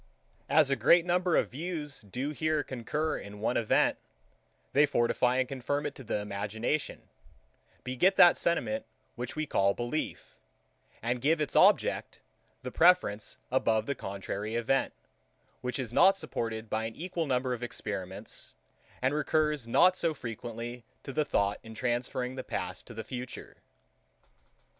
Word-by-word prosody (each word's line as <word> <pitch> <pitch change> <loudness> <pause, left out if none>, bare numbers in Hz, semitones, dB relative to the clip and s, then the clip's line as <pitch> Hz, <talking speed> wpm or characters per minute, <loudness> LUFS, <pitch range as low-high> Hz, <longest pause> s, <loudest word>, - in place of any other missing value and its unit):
As 155 -3 +5
a - - +4
great 165 +8 +5
number 180 0 +2
of - - +2
views 150 -1 -4
do 125 +8 -4
here 155 0 0
concur 150 +5 -2
in 100 0 -10
one 115 +3 0
event, 115 - +2 0.7
they 145 +1 +5
fortify 125 +1 +2
and 130 -1 +1
confirm 140 +3 -2
it - - -2
to 135 - -11
the 110 - -1
imagination, 105 +7 -3 0.8
beget 155 +10 +2
that 175 - +8
sentiment 265 +11 0 0.3
which 125 +1 -5
we 155 0 -1
call 100 -7 +2
belief, 120 +6 -4 0.7
and 120 +1 -1
give 155 +4 +3
its 150 - -2
object - - +3 0.4
the 125 - -5
preference 165 - +3
above 110 -4 +2
the 140 - -1
contrary 100 0 -5
event, 120 +3 +1 0.7
which 125 0 -2
is 125 -4 -4
not 195 +7 +6
supported 115 - -4
by 110 +1 -1
an 115 - -5
equal 170 -1 -3
number 130 -1 0
of 120 - -5
experiments, 100 -6 -5 0.5
and 130 +2 +2
recurs 150 -3 +1
not 180 +10 +5
so 165 -3 0
frequently 120 0 -6 0.2
to 135 - -7
the 155 +1 +1
thought 100 -6 +1
in 110 0 -11
transferring 125 +1 -1
the 130 0 -5
past 90 0 -5
to 115 - -10
the 110 - -5
future. 125 +3 -7
125 Hz, 150 wpm, -30 LUFS, 115-150 Hz, 0.8 s, that